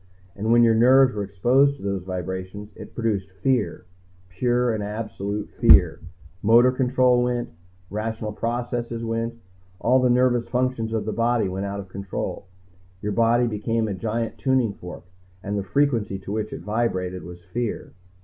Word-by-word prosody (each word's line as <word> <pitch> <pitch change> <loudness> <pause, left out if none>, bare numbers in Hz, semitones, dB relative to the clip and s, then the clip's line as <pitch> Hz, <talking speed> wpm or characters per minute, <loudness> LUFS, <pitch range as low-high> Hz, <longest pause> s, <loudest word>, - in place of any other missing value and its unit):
And 110 +3 -1
when 120 0 +6
your 115 -1 +5
nerves 125 +3 +5
were 105 - -3
exposed 120 +9 +2
to - - -13
those 100 -1 -2
vibrations, 95 +3 -5
it - - -11
produced 105 -5 -1
fear. 105 0 -1 0.4
Pure 120 +5 +1
and 110 - -2
absolute 105 -1 -4
fear. - - +5 0.4
Motor 120 +4 +6
control 125 -1 +3
went, 125 -1 -1 0.4
rational 110 +1 -3
processes 120 0 -3
went, 115 +1 -2 0.4
all 125 +3 +3
the 125 -1 +3
nervous 125 -1 +2
functions 125 -3 -1
of 110 -2 -2
the 110 - -2
body 115 -2 +1
went 95 +2 -3
out 100 0 -4
of 100 - -7
control. 100 0 -5 0.5
Your 105 - -3
body 115 +3 +3
became 115 0 -1
a 105 - -2
giant 115 +4 -3
tuning 130 -5 +1
fork, 90 -2 -10 0.4
and 100 0 -3
the 100 - 0
frequency 115 -3 0
to 95 +1 -8
which 110 0 -2
it - - -6
vibrated 95 -3 -2
was 85 +1 -11
fear. 120 +4 -4
115 Hz, 160 wpm, -24 LUFS, 100-120 Hz, 0.5 s, when